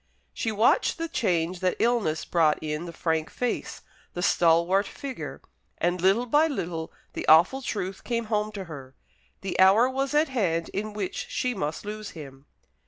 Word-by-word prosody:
She 225 - -2
watched 220 - +3
the 330 0 -3
change 180 - 0
that 185 -1 +1
illness 225 -10 +1
brought 160 -3 +3
in 155 +2 -4
the 170 - -6
frank 160 -1 -1
face, 245 -2 -3 0.3
the 175 - -2
stalwart 175 +4 +3
figure; 275 -2 -7 0.3
and 175 0 0
little 195 +6 +3
by 295 +6 +4
little 170 - -4 0.2
the - - -5
awful 170 +12 +6
truth 195 -6 -4
came 235 -1 -2
home 215 -1 -1
to 200 -2 -5
her. 135 -6 -10 0.5
The 185 -3 -4
hour 195 +6 +6
was 270 +2 -2
at 300 0 +3
hand 175 -10 0
in 215 +1 -4
which 200 -3 -4
she 250 0 -1
must 155 -3 -4
lose 215 0 -6
him. 135 -2 -11
190 Hz, 170 wpm, -26 LUFS, 165-235 Hz, 0.5 s, awful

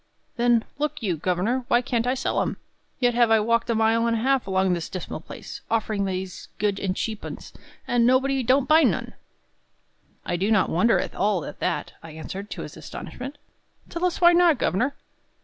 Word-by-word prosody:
"Then, 240 -2 +3 0.2
look 295 -2 -2
you, 185 -5 0
governor, 185 - 0
why 240 +1 +3
can't 240 -2 -1
I 255 - +2
sell 265 - 0
'em? - - -2 0.4
Yet 245 -1 +3
have 235 -1 +4
I 225 0 +5
walked 230 +2 +1
a 230 - +2
mile 225 +1 +3
and 230 0 +1
a - - -2
half 265 -2 +1
along 190 -1 +2
this 170 -2 -3
dismal 185 -3 -5
place, - - -9
offering 215 -3 0
these 185 -1 -4
good 205 -1 0
and 185 -2 -1
cheap 215 0 -3
'uns; - - -8 0.3
and 240 -1 +2
nobody 265 +2 +3
don't 260 +2 +2
buy 315 +1 +6
none!" - - +1 1.1
"I 175 - -1
do 195 +4 0
not 215 -4 +3
wonder 225 +8 +3
at - - -3
all 200 -5 0
at - - -9
that," 180 - -2
I 160 -1 -11
answered, 190 +6 -7
to - - -6
his - - -9
astonishment. 270 +3 -8 0.5
"Tell 340 +1 -5
us 360 -1 +1
why 345 0 +7
not, 345 -4 +5
governor." 250 +9 0
230 Hz, 200 wpm, -24 LUFS, 195-255 Hz, 1.1 s, why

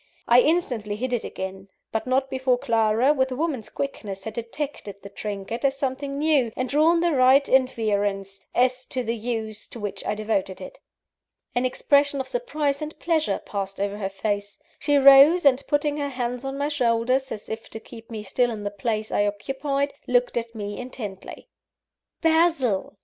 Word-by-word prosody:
I 240 +1 +7
instantly 250 -11 0
hid 250 +3 -3
it 240 - 0
again; 190 +1 -6 0.2
but 220 +2 -2
not 265 +1 +2
before 260 -1 +1
Clara, 230 +2 +2
with 265 -2 0
a - - -2
woman's 285 -6 -2
quickness, 205 -8 -5
had 220 - -5
detected 235 -2 -5
the 200 - -8
trinket 205 +3 -5
as 275 0 +2
something 275 +1 -3
new, 290 -6 +2
and 255 - -1
drawn 320 +5 +3
the 345 0 +2
right 270 0 +5
inference, 205 -6 0
as 255 +1 +2
to 255 - -3
the 230 0 -1
use 220 -2 -4
to 235 - -9
which 205 -2 -5
I - - -1
devoted 205 -3 -2
it. - - -10 0.7
An 245 +1 +1
expression 280 +2 +2
of 265 - -3
surprise 305 - -1
and 305 +1 -6
pleasure 325 -2 0
passed 195 -1 -4
over 200 0 -1
her 195 -2 -3
face; 205 +1 -3 0.2
she 290 -1 +2
rose, 275 +5 +8
and 270 -1 +5
putting 290 0 +1
her 285 -1 -2
hands 250 -1 -3
on 270 0 -4
my 285 +1 -1
shoulders, 255 -1 +1
as 210 - -6
if 220 0 -6
to 220 - -7
keep 225 0 -13
me 220 -2 -6
still 245 +5 +1
in 215 -3 -5
the 205 - -3
place 215 +1 -2
I 205 - +2
occupied, 275 +7 -2
looked 245 0 +2
at 230 -1 -3
me 205 -1 -5
intently. 225 -6 -8 0.7
"Basil!" 320 - +2
250 Hz, 180 wpm, -24 LUFS, 215-280 Hz, 0.7 s, rose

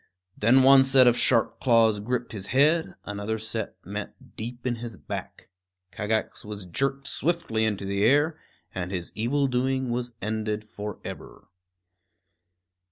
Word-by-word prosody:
Then 125 +5 +4
one 135 0 +8
set 135 -1 +5
of 120 -1 +5
sharp 115 -2 +2
claws 115 -4 +4
gripped 125 +3 -2
his 100 -4 -7
head; 150 +6 +2
another 105 +2 -3
set 110 0 -3
met - - -8
deep 120 +3 -7
in 120 -2 0
his 115 -3 -7
back. - - -7 0.4
Kagax 110 +2 -2
was 105 -2 -7
jerked 135 +9 -2
swiftly 150 -9 0
into 100 -2 -2
the 100 +1 -1
air, 145 +7 +3 0.3
and 90 -1 -3
his 90 -3 -4
evil 135 +6 0
doing 130 0 0
was 120 -1 -3
ended 110 0 -2
forever. 105 -1 -8
115 Hz, 140 wpm, -26 LUFS, 105-130 Hz, 0.4 s, one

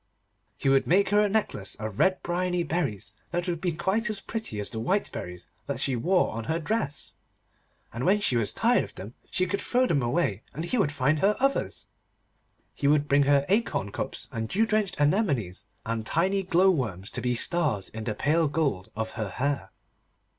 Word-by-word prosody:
He - - -2
would 135 0 +4
make 190 +3 +4
her 205 +1 +4
a 210 - +2
necklace 195 - -1
of 110 -2 -6
red 190 -1 +2
bryony 180 0 0
berries, 150 - -2 0.2
that 175 +1 -2
would 170 -2 -2
be 180 - 0
quite 190 +8 0
as 210 -2 -1
pretty 220 - -4
as 100 - -2
the 110 - -4
white 190 - 0
berries 90 0 -7 0.2
that - - -2
she 135 - +1
wore 180 +10 +2
on 115 0 -5
her 160 - 0
dress, 165 -4 -2 0.8
and 120 +3 -4
when 195 +7 +4
she 205 -11 +1
was 115 -3 +2
tired 240 +2 +3
of - - -11
them, 100 +5 -8 0.2
she 185 - +1
could 200 +2 -2
throw 250 +1 +2
them 150 - +1
away, 120 - 0
and 160 +3 -3
he 245 +7 0
would 150 -8 +2
find 145 +1 +1
her 205 +4 +3
others. 275 +1 0 0.9
He 140 - -1
would 145 0 +3
bring 140 0 +4
her 140 -1 +4
acorn 195 - 0
cups - - -5
and 110 -1 -4
dew 220 +4 +2
drenched 215 -5 0
anemones, 145 - +1 0.2
and 115 0 -2
tiny 185 - +1
glow 185 +1 +4
worms 105 - -3
to - - -2
be 125 -1 0
stars 130 - +1
in 110 0 -7
the 110 - -2
pale 155 +6 +2
gold 140 -11 -1
of 110 0 -3
her 110 -3 -4
hair. 135 -4 -2
150 Hz, 200 wpm, -27 LUFS, 115-190 Hz, 0.9 s, would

